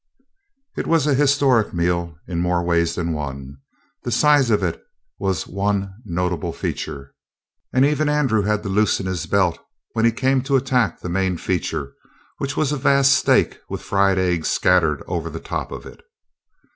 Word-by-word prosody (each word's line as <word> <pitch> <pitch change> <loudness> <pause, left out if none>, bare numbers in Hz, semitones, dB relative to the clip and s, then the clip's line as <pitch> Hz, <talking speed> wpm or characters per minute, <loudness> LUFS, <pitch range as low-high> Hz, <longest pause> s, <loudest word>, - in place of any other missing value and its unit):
It - - -3
was 165 -3 +3
a 150 - +2
historic 135 -6 +3
meal 85 -1 -1
in 85 -2 -3
more 90 0 0 0.2
than 85 0 -2
one 70 -3 -5
way. - - -11 0.5
The 120 - -4
size 140 +1 +4
of 105 -3 +2
it 85 -3 -2 0.4
was 95 -3 -1
one 100 0 -2
notable 90 -3 -2
feature, 70 -1 -5 0.6
and 130 +1 +4
even 150 +1 +1
Andrew 135 -8 +2
had 105 +1 0
to 100 - -4
loosen 100 -1 +1
his 95 -3 -3
belt 95 -4 +1 0.3
when 115 - -1
he 115 - +5
came 130 +3 +1
to 140 - +1
attack 130 -4 +1
the - - -5
main 95 0 0
feature, 80 -6 -3 0.5
which 140 +1 -3
was 150 -2 +1
a 150 - -1
vast 140 0 +4
steak - - +2
with - - -5
fried 100 -1 +2
eggs 90 -3 0
scattered 80 -5 +2
over - - -3
the - - -7
top - - -5
of - - -8
it. - - -12
100 Hz, 170 wpm, -21 LUFS, 90-130 Hz, 0.6 s, he